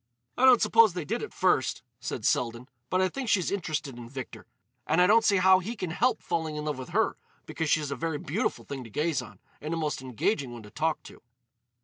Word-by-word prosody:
"I 260 Hz, -, +3 dB
don't 255 Hz, -3 st, +7 dB
suppose 225 Hz, -4 st, +5 dB
they 175 Hz, -4 st, -3 dB
did -, -, -2 dB
at -, -, -6 dB
first," -, -, +1 dB, 0.2 s
said -, -, -5 dB
Selden. 120 Hz, +1 st, 0 dB, 0.2 s
"But 185 Hz, -, +2 dB
I 185 Hz, -, +3 dB
think 260 Hz, +4 st, -4 dB
she's 185 Hz, -5 st, +2 dB
interested 155 Hz, -9 st, -3 dB
in 115 Hz, -1 st, -9 dB
Victor. 130 Hz, -1 st, -8 dB, 0.4 s
And 160 Hz, -, +2 dB
I 180 Hz, -, +7 dB
don't 225 Hz, +4 st, +5 dB
see 200 Hz, -2 st, +4 dB
how 185 Hz, 0 st, +6 dB
he 215 Hz, +6 st, -5 dB
can 185 Hz, -6 st, -4 dB
help 240 Hz, +7 st, +1 dB
falling 160 Hz, -3 st, -2 dB
in 150 Hz, 0 st, -4 dB
love 150 Hz, -3 st, -2 dB
with 130 Hz, -, -7 dB
her, -, -, +1 dB, 0.3 s
because 160 Hz, -2 st, -3 dB
she's 150 Hz, -2 st, +1 dB
a -, -, -1 dB
very 160 Hz, +3 st, -2 dB
beautiful -, -, -2 dB
thing 135 Hz, -2 st, -6 dB
to 115 Hz, -, -11 dB
gaze 150 Hz, +5 st, 0 dB
on, -, -, -12 dB, 0.2 s
and 155 Hz, +3 st, -3 dB
a -, -, -3 dB
most 150 Hz, -4 st, -2 dB
engaging 130 Hz, -, -1 dB
one 120 Hz, -2 st, -9 dB
to 105 Hz, -, -13 dB
talk 160 Hz, 0 st, -1 dB
to." -, -, -13 dB
160 Hz, 235 wpm, -28 LUFS, 135-185 Hz, 0.4 s, don't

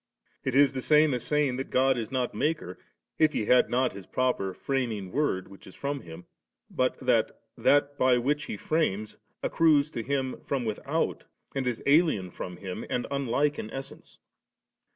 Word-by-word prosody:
it 130 Hz, -1 st, -1 dB
is 140 Hz, 0 st, +5 dB
the 130 Hz, -, -3 dB
same 150 Hz, +1 st, +4 dB
as 125 Hz, -, -1 dB
saying, 145 Hz, -2 st, +1 dB
that 135 Hz, -, -4 dB
God 130 Hz, +1 st, +3 dB
is 115 Hz, -3 st, -4 dB
not 125 Hz, -2 st, -1 dB
Maker, 150 Hz, -, -2 dB, 0.4 s
if 155 Hz, -1 st, +4 dB
He 105 Hz, -, -1 dB
had 125 Hz, +3 st, +4 dB
not 125 Hz, 0 st, +1 dB
His 95 Hz, -2 st, -10 dB
proper 125 Hz, -7 st, 0 dB
Framing 110 Hz, -5 st, -2 dB
Word 135 Hz, -11 st, 0 dB
which 100 Hz, 0 st, -15 dB
is 95 Hz, -, -12 dB
from 140 Hz, 0 st, -3 dB
Him, 85 Hz, +1 st, -11 dB, 0.5 s
but 130 Hz, 0 st, 0 dB
that 125 Hz, -4 st, +1 dB, 0.2 s
That 145 Hz, 0 st, +2 dB
by 130 Hz, -1 st, +4 dB
which 145 Hz, +4 st, 0 dB
He -, -, -5 dB
frames, 110 Hz, -8 st, -1 dB, 0.3 s
accrues 155 Hz, -2 st, +3 dB
to 115 Hz, -, -3 dB
Him 130 Hz, +1 st, -2 dB
from 135 Hz, -4 st, -2 dB
without^, 110 Hz, -2 st, -1 dB, 0.3 s
and 135 Hz, -2 st, -2 dB
is 120 Hz, -2 st, -2 dB
alien 140 Hz, -, +3 dB
from 90 Hz, 0 st, -7 dB
Him, 95 Hz, -1 st, -6 dB
and 125 Hz, -, -1 dB
unlike 140 Hz, +2 st, 0 dB
in 110 Hz, -, -5 dB
essence. 135 Hz, +2 st, -9 dB
130 Hz, 175 wpm, -28 LUFS, 110-145 Hz, 0.5 s, is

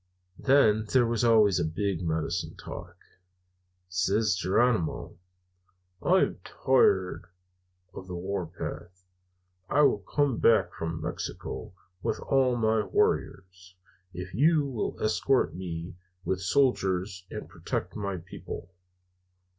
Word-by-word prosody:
Then 110 Hz, -6 st, +4 dB
there 130 Hz, -2 st, +5 dB
was 115 Hz, 0 st, 0 dB
always 110 Hz, -5 st, +5 dB
a -, -, +1 dB
big 90 Hz, +3 st, -2 dB
medicine 80 Hz, +1 st, -2 dB
talk. -, -, -9 dB, 0.9 s
Says 95 Hz, +4 st, +1 dB
Geronimo: 95 Hz, -1 st, 0 dB, 0.8 s
"'I -, -, +2 dB
am -, -, 0 dB
tired 95 Hz, -10 st, +2 dB, 0.7 s
of 95 Hz, -, -9 dB
the 90 Hz, -, -6 dB
warpath. 90 Hz, 0 st, -5 dB, 0.6 s
I 150 Hz, +2 st, +4 dB
will 105 Hz, -, +4 dB
come 135 Hz, +5 st, 0 dB
back 115 Hz, -, +4 dB
from 80 Hz, 0 st, -4 dB
Mexico -, -, -5 dB, 0.3 s
with -, -, -1 dB
all 130 Hz, -2 st, +2 dB
my 110 Hz, -1 st, +2 dB
warriors, 90 Hz, -2 st, -1 dB, 0.4 s
if 90 Hz, +1 st, -7 dB
you 150 Hz, -, +3 dB
will 130 Hz, -6 st, -3 dB
escort 125 Hz, +4 st, +1 dB
me 85 Hz, -1 st, -6 dB, 0.3 s
with 95 Hz, +2 st, -1 dB
soldiers 95 Hz, -5 st, +1 dB
and -, -, -7 dB
protect -, -, -4 dB
my 100 Hz, -3 st, -3 dB
people.' 90 Hz, +1 st, -9 dB
95 Hz, 115 wpm, -28 LUFS, 90-115 Hz, 0.9 s, there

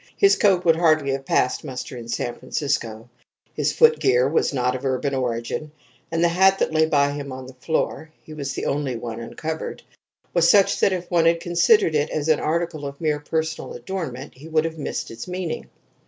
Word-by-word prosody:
His 395 Hz, -1 st, +5 dB
coat 190 Hz, -3 st, +3 dB
would 165 Hz, -1 st, +5 dB
hardly 155 Hz, -4 st, +3 dB
have 135 Hz, 0 st, -4 dB
passed 125 Hz, -, +1 dB
muster 130 Hz, -3 st, -6 dB
in 120 Hz, -1 st, -8 dB
San 120 Hz, +1 st, -2 dB
Francisco: 120 Hz, -5 st, -3 dB, 0.5 s
his -, -, 0 dB
footgear 135 Hz, -, +4 dB
was 150 Hz, -, +1 dB
not 125 Hz, -2 st, 0 dB
of 130 Hz, -, -6 dB
urban 135 Hz, +1 st, -1 dB
origin, 125 Hz, +3 st, -2 dB, 0.4 s
and 165 Hz, 0 st, +1 dB
the -, -, +6 dB
hat 190 Hz, +3 st, +4 dB
that -, -, 0 dB
lay 160 Hz, 0 st, +3 dB
by 145 Hz, -2 st, +2 dB
him 145 Hz, -1 st, -6 dB
on 130 Hz, 0 st, -7 dB
the 130 Hz, -, -11 dB
floor 155 Hz, +3 st, -2 dB
(he 155 Hz, -, -11 dB
was 140 Hz, -3 st, -4 dB
the -, -, -4 dB
only 140 Hz, -3 st, -1 dB
one 115 Hz, -1 st, -6 dB
uncovered) 155 Hz, +7 st, -5 dB, 0.5 s
was 170 Hz, -1 st, +4 dB
such 200 Hz, -2 st, +4 dB
that -, -, +3 dB
if 180 Hz, -1 st, -4 dB
one 170 Hz, -2 st, +3 dB
had 165 Hz, 0 st, +4 dB
considered 175 Hz, +2 st, +3 dB
it 150 Hz, 0 st, +1 dB
as 155 Hz, 0 st, -2 dB
an 155 Hz, -, +4 dB
article 160 Hz, -2 st, -2 dB
of 140 Hz, 0 st, -9 dB
mere 150 Hz, -2 st, 0 dB
personal 160 Hz, +2 st, -3 dB
adornment 155 Hz, -9 st, -6 dB
he 140 Hz, +5 st, -12 dB
would 160 Hz, 0 st, +1 dB
have 160 Hz, -1 st, -5 dB
missed -, -, -4 dB
its 115 Hz, +7 st, -8 dB
meaning. 180 Hz, -2 st, -4 dB
155 Hz, 200 wpm, -23 LUFS, 130-170 Hz, 0.5 s, the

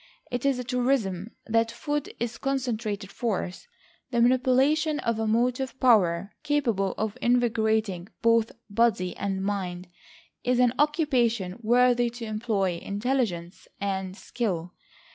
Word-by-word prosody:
It 245 Hz, +3 st, -1 dB
is 275 Hz, -2 st, +2 dB
a 250 Hz, -, -3 dB
truism 240 Hz, -6 st, 0 dB, 0.2 s
that 225 Hz, 0 st, +2 dB
food 290 Hz, +4 st, -3 dB
is 230 Hz, -1 st, -3 dB
concentrated 225 Hz, -7 st, -2 dB
force. 210 Hz, -, -3 dB, 0.4 s
The 240 Hz, -2 st, 0 dB
manipulation 260 Hz, +5 st, +3 dB
of 230 Hz, -5 st, -1 dB
a 220 Hz, -, 0 dB
motive 250 Hz, +4 st, 0 dB
power 200 Hz, -6 st, +3 dB
capable 245 Hz, -11 st, 0 dB
of 215 Hz, -1 st, -3 dB
invigorating 220 Hz, -6 st, +1 dB, 0.2 s
both 230 Hz, -1 st, +4 dB, 0.2 s
body 205 Hz, -4 st, +1 dB
and 195 Hz, -1 st, -2 dB
mind, 185 Hz, -3 st, -3 dB, 0.5 s
is 250 Hz, 0 st, +2 dB
an 245 Hz, -1 st, +4 dB
occupation 245 Hz, -, +1 dB
worthy 245 Hz, +1 st, +4 dB
to 235 Hz, 0 st, -7 dB
employ 215 Hz, -5 st, -1 dB
intelligence 200 Hz, -5 st, -2 dB
and 190 Hz, -1 st, -3 dB
skill. 180 Hz, -9 st, -3 dB
230 Hz, 125 wpm, -27 LUFS, 200-250 Hz, 0.5 s, both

